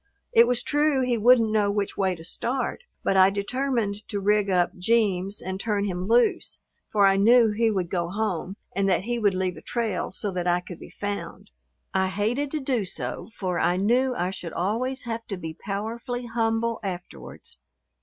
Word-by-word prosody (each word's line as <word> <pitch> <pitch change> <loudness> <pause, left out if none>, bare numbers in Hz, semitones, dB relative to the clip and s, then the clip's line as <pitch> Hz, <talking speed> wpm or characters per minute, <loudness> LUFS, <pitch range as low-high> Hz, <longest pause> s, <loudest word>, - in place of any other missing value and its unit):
It 230 +1 +7
was 245 -1 0
true, 295 -2 +2
he 250 -1 +1
wouldn't 230 0 +5
know 210 -2 +2
which 200 0 -1
way 190 -2 +1
to 165 - -12
start, 260 - -3 0.2
but - - +1
I 190 0 +7
determined 210 0 -2
to 205 - -3
rig 205 0 +2
up 180 -2 +2
"Jeems" 200 -2 +1
and 190 0 -4
turn 205 -1 0
him 180 -1 -3
loose, 235 +2 +2 0.3
for 205 -2 +4
I 195 0 +5
knew 230 +2 +6
he 225 +2 +2
would 185 -5 -1
go 175 -2 -1
home 195 -2 -2 0.2
and 195 0 +2
that 185 0 +2
he 240 +2 -2
would 205 -4 +2
leave 185 -1 -1
a - - -10
trail 225 -7 -2
so 200 +2 -3
that 180 -1 -2
I 175 0 +3
could 180 -1 -10
be - - -11
found. 205 0 -6 0.4
I 190 0 +2
hated 220 +9 -1
to 310 - -2
do 260 -5 0
so, 150 - -5
for 180 -3 -2
I 175 - +2
knew 245 +6 +2
I 180 -2 -1
should 180 -3 -7
always 240 +9 -1
have 230 -1 -5
to 195 - -4
be 160 -2 -6
powerfully 225 +7 -4
humble 230 0 0
afterwards. 175 - -7
205 Hz, 195 wpm, -25 LUFS, 185-235 Hz, 0.4 s, It